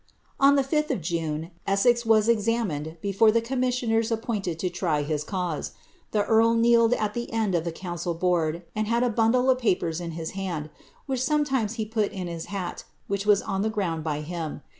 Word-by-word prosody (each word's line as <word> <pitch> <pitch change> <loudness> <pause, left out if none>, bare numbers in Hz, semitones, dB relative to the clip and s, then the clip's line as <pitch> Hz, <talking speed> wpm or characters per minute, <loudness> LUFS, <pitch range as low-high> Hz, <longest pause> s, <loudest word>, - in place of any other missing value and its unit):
On 275 +1 +6
the 275 - +3
5th 300 +3 0
of - - 0
June, 165 -1 -3 0.2
Essex 235 +4 +3
was 220 -1 +4
examined 210 -9 0
before 200 +2 +4
the 230 - +3
commissioners 245 -2 0
appointed 215 -7 -2
to 180 - -1
try 170 -4 -1
his 150 0 -2
cause. 180 -3 -3 0.4
The 210 -1 +1
earl 225 +1 +4
kneeled 230 0 +4
at 210 -1 -2
the 240 +1 -4
end 220 -4 0
of 170 -1 0
the 170 - -1
council* 175 0 -4
board, 170 -1 0
and 215 0 -1
had 235 +2 +2
a 250 - +2
bundle 230 +3 +2
of 255 - +1
papers 180 -7 0
in 170 -1 -5
his 165 +1 -5
hand, 175 -6 -4 0.3
which 260 -3 -1
sometimes 265 -6 +1
he 220 -2 -2
put 215 -1 -1
in 190 -3 -5
his 170 -1 -5
hat, 190 -3 -5 0.2
which 200 +1 -3
was 205 -1 +5
on 195 0 -2
the 220 - +1
ground 180 -7 -2
by 150 -1 -2
him. 160 -2 -5
205 Hz, 200 wpm, -26 LUFS, 170-230 Hz, 0.4 s, On